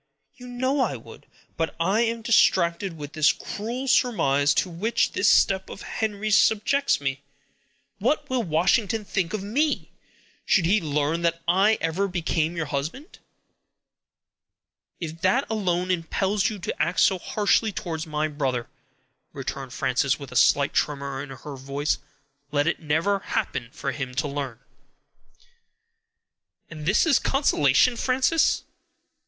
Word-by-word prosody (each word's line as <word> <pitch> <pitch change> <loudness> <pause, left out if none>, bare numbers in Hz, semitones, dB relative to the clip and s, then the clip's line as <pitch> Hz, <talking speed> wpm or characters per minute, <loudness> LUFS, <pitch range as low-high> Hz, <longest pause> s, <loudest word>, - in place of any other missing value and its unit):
"You 250 -2 -12
know 260 +3 -1
I 260 - +1
would; - - -13 0.3
but 165 0 -2
I 195 +7 +2
am 230 -1 -1
distracted 175 -5 +2
with 145 -1 -8
the 155 -1 +4
cruel 240 +6 -5
surmise 145 - +2
to - - +1
which 185 +7 0
this - - +2
step 190 -1 +3
of - - -9
Henry's 215 -1 -1
subjects 225 +8 +3
me. 135 -1 -3 0.8
What 305 - 0
will 255 -1 0
Washington 200 +4 +1
think 185 -3 -1
of 215 -3 -3
me, 285 +9 -1 0.5
should 180 - +2
he 200 +5 +3
learn 150 +1 -1
that 170 0 -1
I 195 +5 +4
ever 170 +5 0
became 170 -2 -1
your 165 - -1
husband?" 155 - -5 1.8
"If 165 -1 -6
that 240 +9 +2
alone 185 -4 0
impels 190 +3 0
you 215 - -6
to 175 - -4
act 170 +3 0
so 190 - +4
harshly 210 +3 +1
towards 160 -4 -5
my 155 0 -1
brother," 135 -5 -2 0.6
returned - - -6
Frances, - - 0
with - - -10
a - - -9
slight - - +4
tremor 140 -2 -1
in 145 - -8
her 135 +2 -8
voice, 140 +3 -2 0.5
"let 145 -1 +1
it 170 - 0
never 165 +6 0
happen 120 -9 -3
for 135 - -4
him 130 -2 -5
to 140 +4 0
learn." 140 -4 -4 2.1
"And 155 -1 -7
this 195 - +4
is 315 -4 +4
consolation, 245 - +3
Frances!" 260 +6 +2
175 Hz, 140 wpm, -25 LUFS, 150-215 Hz, 2.1 s, the